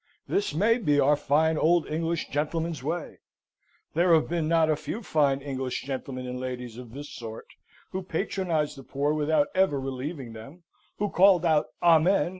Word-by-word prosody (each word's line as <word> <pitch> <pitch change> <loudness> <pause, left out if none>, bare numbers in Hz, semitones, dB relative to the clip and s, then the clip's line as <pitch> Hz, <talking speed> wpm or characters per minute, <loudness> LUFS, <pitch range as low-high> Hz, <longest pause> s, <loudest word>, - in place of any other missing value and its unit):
This 200 -7 -1
may 225 +8 +3
be 150 -9 +2
our 145 +2 +4
fine 155 +2 +2
old 170 +1 +3
English 165 +1 -2
gentleman's 160 +1 -2
way. 165 +4 -4 0.7
There 170 +1 +4
have 160 - +2
been 165 -2 -1
not 165 -1 +3
a 155 - +2
few 175 +9 -6
fine 140 -6 +1
English 130 -3 -3
gentlemen 130 -1 -5
and 125 0 -5
ladies 125 -2 -5
of 120 -2 -10
this 145 +2 -8
sort; 115 -1 -8 0.5
who 190 - -3
patronised 170 -5 -2
the - - -10
poor 145 +3 -1
without 150 -1 +1
ever 185 -7 +2
relieving 135 -1 -5
them, 135 +11 -12 0.3
who 210 - 0
called 185 -2 +5
out 155 -2 +3 0.2
"Amen!" 170 0 +4
155 Hz, 170 wpm, -27 LUFS, 135-170 Hz, 0.7 s, called